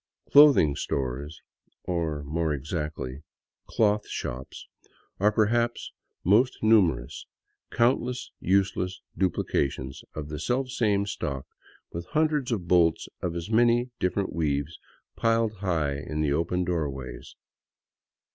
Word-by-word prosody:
Clothing 140 Hz, -, +7 dB
stores, 70 Hz, +3 st, -3 dB, 0.4 s
or 80 Hz, -4 st, -2 dB
more 80 Hz, +1 st, -1 dB
exactly, 75 Hz, -2 st, -4 dB, 0.5 s
clothshops, 105 Hz, -, -1 dB, 0.5 s
are 105 Hz, +3 st, +4 dB
perhaps 115 Hz, +3 st, +1 dB, 0.3 s
most 110 Hz, +8 st, +4 dB
numer 100 Hz, -, +4 dB
ous, -, -, -10 dB, 0.4 s
countless 125 Hz, +1 st, 0 dB
useless 95 Hz, -1 st, 0 dB, 0.2 s
duplications 70 Hz, -7 st, -1 dB
of 75 Hz, -1 st, -5 dB
the 75 Hz, 0 st, -5 dB
selfsame 115 Hz, -, 0 dB
stock, 70 Hz, -9 st, -4 dB, 0.5 s
with 85 Hz, +1 st, -6 dB
hundreds 150 Hz, -4 st, +1 dB
of 95 Hz, -7 st, -2 dB
bolts 85 Hz, -2 st, +3 dB
of 85 Hz, -1 st, -2 dB
as 85 Hz, +5 st, -5 dB
many 120 Hz, +2 st, +3 dB
different 95 Hz, +2 st, -1 dB
weaves 75 Hz, -1 st, -1 dB, 0.4 s
piled 115 Hz, -2 st, +1 dB
high 80 Hz, -7 st, -1 dB
in 75 Hz, +2 st, -4 dB
the 75 Hz, -2 st, +1 dB
open 90 Hz, +4 st, 0 dB
doorways. 70 Hz, -8 st, -4 dB
90 Hz, 110 wpm, -27 LUFS, 75-110 Hz, 0.5 s, Clothing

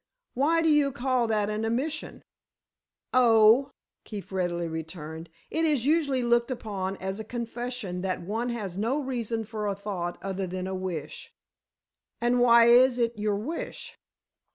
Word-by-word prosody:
"Why 320 Hz, +6 st, +2 dB
do -, -, +2 dB
you 295 Hz, -2 st, +4 dB
call 250 Hz, -1 st, 0 dB
that 210 Hz, -2 st, +1 dB
an 215 Hz, +1 st, -2 dB
admission?" 265 Hz, +8 st, -2 dB, 0.9 s
"Oh," 230 Hz, +1 st, +6 dB, 0.3 s
Keefe 205 Hz, -3 st, -8 dB
readily 175 Hz, -2 st, -1 dB
returned, 160 Hz, 0 st, -7 dB, 0.2 s
"it 320 Hz, -, 0 dB
is 295 Hz, -7 st, +2 dB
usually 285 Hz, -4 st, +2 dB
looked 235 Hz, 0 st, +2 dB
upon 195 Hz, -6 st, -4 dB
as 190 Hz, +2 st, -4 dB
a -, -, -4 dB
confession 235 Hz, -4 st, -4 dB
that 185 Hz, -2 st, -2 dB
one 225 Hz, +6 st, -2 dB
has 200 Hz, -6 st, -4 dB
no 240 Hz, +7 st, 0 dB
reason 235 Hz, -5 st, -2 dB
for 215 Hz, -1 st, -4 dB
a 200 Hz, -, -1 dB
thought 190 Hz, -4 st, -4 dB
other 190 Hz, -1 st, -3 dB
than 185 Hz, +1 st, -4 dB
a 190 Hz, -, -4 dB
wish." 180 Hz, -5 st, -5 dB, 0.9 s
"And 240 Hz, +1 st, +2 dB
why 235 Hz, -1 st, +7 dB
is 245 Hz, +1 st, +6 dB
it 235 Hz, -1 st, 0 dB
your 210 Hz, -1 st, 0 dB
wish?" 270 Hz, +12 st, -5 dB
225 Hz, 155 wpm, -27 LUFS, 190-250 Hz, 0.9 s, why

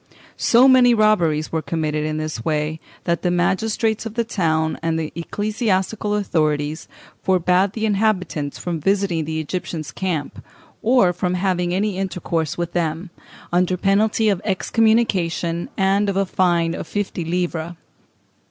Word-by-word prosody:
So 245 Hz, +3 st, +5 dB
many 250 Hz, -2 st, +6 dB
robberies 175 Hz, -8 st, +2 dB
were 160 Hz, -, -1 dB
committed 155 Hz, 0 st, -2 dB
in 155 Hz, 0 st, -2 dB
this 155 Hz, -7 st, -4 dB
way, 155 Hz, +1 st, -1 dB, 0.2 s
that 170 Hz, -1 st, 0 dB
the 180 Hz, -, +1 dB
magistrates 215 Hz, +5 st, 0 dB
of 225 Hz, -1 st, -7 dB
the 235 Hz, -, +1 dB
town 160 Hz, -8 st, 0 dB
and 165 Hz, 0 st, 0 dB
the 160 Hz, -1 st, -3 dB
ecclesiastical 205 Hz, +2 st, -1 dB
authorities 155 Hz, -6 st, -1 dB, 0.4 s
forbad 185 Hz, +1 st, +2 dB
the 220 Hz, -1 st, -2 dB
inhabitants 195 Hz, -9 st, 0 dB
from 170 Hz, -2 st, -3 dB
visiting 195 Hz, -2 st, 0 dB
the 160 Hz, +1 st, -3 dB
Egyptians' 160 Hz, -1 st, -4 dB
camp, 170 Hz, -7 st, -3 dB, 0.4 s
or 225 Hz, -6 st, +4 dB
from 180 Hz, 0 st, -1 dB
having 180 Hz, -1 st, 0 dB
any 195 Hz, +1 st, -1 dB
intercourse 170 Hz, -5 st, -2 dB
with 175 Hz, 0 st, -3 dB
them, 170 Hz, +1 st, -2 dB, 0.4 s
under 180 Hz, +1 st, +2 dB
penalty 210 Hz, +4 st, +2 dB
of 195 Hz, -3 st, 0 dB
excommunication 190 Hz, -5 st, +1 dB
and 195 Hz, +1 st, +2 dB
of 195 Hz, -, -1 dB
a 195 Hz, -, +2 dB
fine 175 Hz, -3 st, +1 dB
of -, -, -6 dB
fifty 205 Hz, -4 st, -3 dB
livres. 170 Hz, -1 st, -2 dB
180 Hz, 145 wpm, -21 LUFS, 160-205 Hz, 0.4 s, many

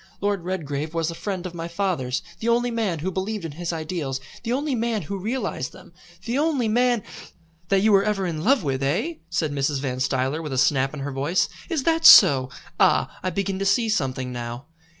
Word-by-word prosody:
Lord 200 Hz, -3 st, -1 dB
Redgrave 155 Hz, -4 st, -4 dB
was 165 Hz, 0 st, 0 dB
a -, -, -6 dB
friend 185 Hz, +1 st, -4 dB
of 180 Hz, -, -5 dB
my 165 Hz, -1 st, -5 dB
father's, 170 Hz, -8 st, -2 dB, 0.2 s
the 230 Hz, -, -1 dB
only 240 Hz, +1 st, +2 dB
man 220 Hz, -7 st, -1 dB
who 175 Hz, +5 st, -3 dB
believed 190 Hz, +1 st, -3 dB
in 165 Hz, -, -5 dB
his 175 Hz, +3 st, -4 dB
ideals, 155 Hz, -5 st, -3 dB, 0.2 s
the 235 Hz, -, -4 dB
only 280 Hz, +3 st, 0 dB
man 230 Hz, -4 st, -1 dB
who 195 Hz, +6 st, -5 dB
realised 210 Hz, -, -3 dB
them, 185 Hz, -1 st, -15 dB, 0.3 s
the 240 Hz, +4 st, -1 dB
only 290 Hz, -6 st, +1 dB
man 240 Hz, 0 st, +2 dB, 0.3 s
" 165 Hz, 0 st, -36 dB
"That 195 Hz, -1 st, +3 dB
you 215 Hz, +1 st, +4 dB
were 195 Hz, -1 st, +5 dB
ever 205 Hz, -2 st, 0 dB
in 160 Hz, -3 st, -3 dB
love 265 Hz, 0 st, +3 dB
with, 135 Hz, -2 st, -1 dB
eh?" 175 Hz, -, -1 dB
said 160 Hz, -3 st, -1 dB
Mrs. 140 Hz, 0 st, 0 dB
Van 130 Hz, -2 st, -3 dB
Stuyler 135 Hz, +3 st, 0 dB
with 150 Hz, -4 st, -5 dB
a -, -, -2 dB
snap 135 Hz, +2 st, +2 dB
in 145 Hz, -, -6 dB
her 140 Hz, +1 st, -4 dB
voice. 145 Hz, +7 st, 0 dB, 0.2 s
"Is 320 Hz, -6 st, -1 dB
that 325 Hz, +1 st, +1 dB
so? 135 Hz, -, +8 dB, 0.3 s
Ah, -, -, +3 dB
I 185 Hz, -, -1 dB
begin 195 Hz, +1 st, -2 dB
to -, -, -1 dB
see 220 Hz, +3 st, +2 dB
something 130 Hz, -10 st, -1 dB
now." 120 Hz, +1 st, -6 dB
175 Hz, 215 wpm, -24 LUFS, 145-215 Hz, 0.3 s, so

